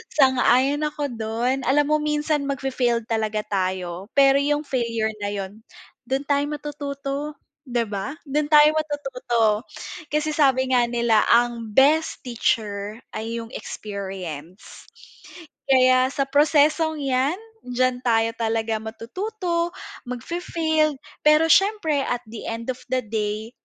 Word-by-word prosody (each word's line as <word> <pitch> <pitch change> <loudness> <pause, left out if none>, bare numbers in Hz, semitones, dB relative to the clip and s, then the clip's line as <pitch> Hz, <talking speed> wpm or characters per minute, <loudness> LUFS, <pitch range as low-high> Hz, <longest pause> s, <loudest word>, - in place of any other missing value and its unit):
Sang-ayon 265 0 +4
ako 290 -2 -4
dun 230 +3 -1
alam 290 +2 +4
mo 305 - +3
minsan 300 -1 0
mag-fai-failed 255 -4 0
talaga 220 -1 -1
tayo, 185 -2 -3
pero 275 0 +6
yung 295 +1 0
failure 230 -5 -1
na 205 - -3
yun 200 0 -5 0.5
dun 265 +2 -1
tayo 285 0 +1
matututo 290 0 -5 0.3
'di 240 -1 0
ba 205 +8 -4
dun 295 +1 -1
tayo 300 0 +7
matututo. 250 -7 -1 0.4
Kasi 300 +1 -1
sabi 265 -4 +2
nga 245 -2 +4
nila 235 -2 +2
ang 235 -1 +2
best 305 +4 +3
teacher 215 -3 -2
ay 225 +1 -4
yung 230 - -13
experience, 190 -4 -7 0.8
kaya 255 -1 +5
sa 275 - +1
prosesong 305 +2 +3
'yan 270 +3 +1 0.3
diyan 250 0 0
tayo 225 -1 +3
talaga 225 -1 0
matututo 340 - -3 0.4
mag 250 -1 -5
fai-fail, 315 -3 0 0.3
pero 305 +2 +6
syempre 390 -7 +3
at 245 0 -2
the 225 0 -8
end 230 +2 -5
of 255 - -9
the 255 0 +2
day 215 0 -3
255 Hz, 125 wpm, -23 LUFS, 225-295 Hz, 0.8 s, tayo